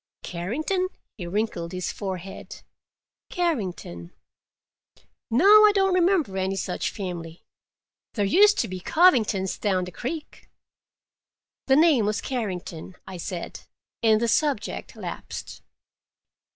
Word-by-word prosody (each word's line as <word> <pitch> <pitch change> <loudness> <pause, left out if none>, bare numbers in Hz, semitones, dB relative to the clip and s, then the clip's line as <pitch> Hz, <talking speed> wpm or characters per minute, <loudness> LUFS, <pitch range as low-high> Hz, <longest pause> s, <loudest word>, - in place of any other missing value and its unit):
"Carrington?" 295 - -2 0.3
He 175 -5 -7
wrinkled 180 -3 -2
his 185 -1 -3
forehead. 190 -1 -7 0.7
"Carrington? 190 - -3 1.2
No, 250 +11 +2 0.2
I - - +5
don't 385 -1 +3
remember 355 - +2
any 190 +1 -1
such 185 -2 -2
family. 175 -4 -7 0.7
There 205 -3 +1
used 410 - +5
to 230 - -2
be 185 -1 -6
Covingtons 220 - +3
down 190 -3 +1
the 180 - -7
creek." 295 - -7 1.2
"The 265 - +5
name 295 -8 +4
was 210 - 0
Carrington," 190 -8 -5
I 190 - -8
said, 175 0 -6 0.4
and 220 -2 +4
the 235 - 0
subject 275 -1 -1
lapsed. - - -7
210 Hz, 110 wpm, -25 LUFS, 185-300 Hz, 1.2 s, I